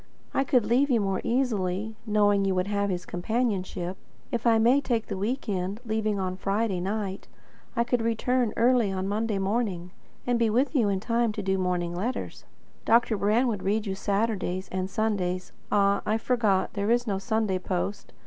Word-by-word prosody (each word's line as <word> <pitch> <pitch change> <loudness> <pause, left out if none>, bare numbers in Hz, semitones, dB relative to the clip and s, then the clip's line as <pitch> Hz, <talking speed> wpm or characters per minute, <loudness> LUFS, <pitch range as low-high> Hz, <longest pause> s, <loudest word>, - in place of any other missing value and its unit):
I 270 - +2
could 250 -4 +2
leave 250 +6 +3
you 240 -3 +3
more 195 -2 -1
easily, 220 -4 0
knowing 205 -1 +3
you 195 -1 +1
would 185 0 +1
have 200 0 0
his 180 -1 -3
companionship. 190 -2 -2 0.3
If 235 -2 -1
I 225 -1 +5
may 240 +5 +4
take 235 -5 -1
the - - -4
week 230 +9 -2
end, 195 +1 -2
leaving 215 -2 0
on 185 -1 -2
Friday 195 0 0
night, 195 +1 -3 0.5
I 235 - +3
could 240 0 0
return 230 +1 +1
early 235 -3 +3
on 190 0 -2
Monday 215 +1 -1
morning, 195 -3 -1 0.3
and 245 -1 +1
be 230 -1 +3
with 255 +8 +1
you 235 -8 +3
in 195 -1 0
time 230 0 +1
to 210 - -4
do 190 0 +1
the 190 - 0
morning 175 -1 -1
letters. 215 +9 -4 0.4
Dr. 230 -1 +3
Brand 215 +5 +2
would 210 -5 -2
read 210 +3 0
you 195 - -2
Saturday's 195 -2 -1
and 185 0 -2
Sunday's 185 -3 -1 0.2
Ah, 200 -1 +3
I 215 - +1
forgot; 220 -5 +1
there 200 0 -1
is 240 +1 +3
no 200 -4 -1
Sunday 205 -1 0
post. 190 +2 -3
210 Hz, 185 wpm, -27 LUFS, 190-230 Hz, 0.5 s, I